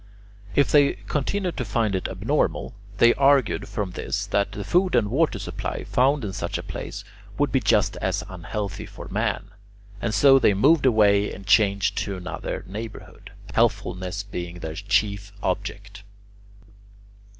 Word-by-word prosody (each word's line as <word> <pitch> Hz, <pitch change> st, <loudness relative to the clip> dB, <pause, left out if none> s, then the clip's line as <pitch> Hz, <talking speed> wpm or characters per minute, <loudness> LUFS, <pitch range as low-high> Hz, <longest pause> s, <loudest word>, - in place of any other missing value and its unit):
If 140 Hz, -, +3 dB
they 145 Hz, -2 st, +5 dB
continued 180 Hz, +5 st, -3 dB
to -, -, -1 dB
find 110 Hz, -1 st, 0 dB
it 95 Hz, -, -1 dB
abnormal, -, -, -1 dB, 0.2 s
they 120 Hz, +3 st, +6 dB
argued 140 Hz, -3 st, +3 dB
from 100 Hz, -3 st, -3 dB
this 100 Hz, +2 st, -3 dB
that 100 Hz, 0 st, 0 dB
the 100 Hz, +1 st, -5 dB
food 180 Hz, -, +2 dB
and 110 Hz, -4 st, +2 dB
water 150 Hz, -3 st, +2 dB
supply 100 Hz, -, -5 dB
found 135 Hz, 0 st, +2 dB
in 95 Hz, -, -4 dB
such 85 Hz, -4 st, -3 dB
a -, -, -6 dB
place -, -, -6 dB, 0.3 s
would -, -, +1 dB
be -, -, +3 dB
just -, -, +2 dB
as -, -, -1 dB
unhealthy 95 Hz, +2 st, -5 dB
for -, -, -10 dB
man, -, -, -2 dB, 0.5 s
and 115 Hz, -, -1 dB
so 135 Hz, +4 st, +6 dB
they 105 Hz, -, +4 dB
moved 140 Hz, +7 st, +4 dB
away 105 Hz, -3 st, +4 dB
and 95 Hz, -, -9 dB
changed 100 Hz, -2 st, +3 dB
to 100 Hz, -2 st, -3 dB
another 90 Hz, -2 st, -5 dB
neighbourhood, 110 Hz, +3 st, -9 dB, 0.2 s
healthfulness 100 Hz, -4 st, 0 dB
being 90 Hz, -3 st, -6 dB
their 80 Hz, -2 st, -6 dB
chief 100 Hz, +1 st, 0 dB
object. 100 Hz, +1 st, -4 dB
105 Hz, 150 wpm, -24 LUFS, 100-125 Hz, 0.5 s, they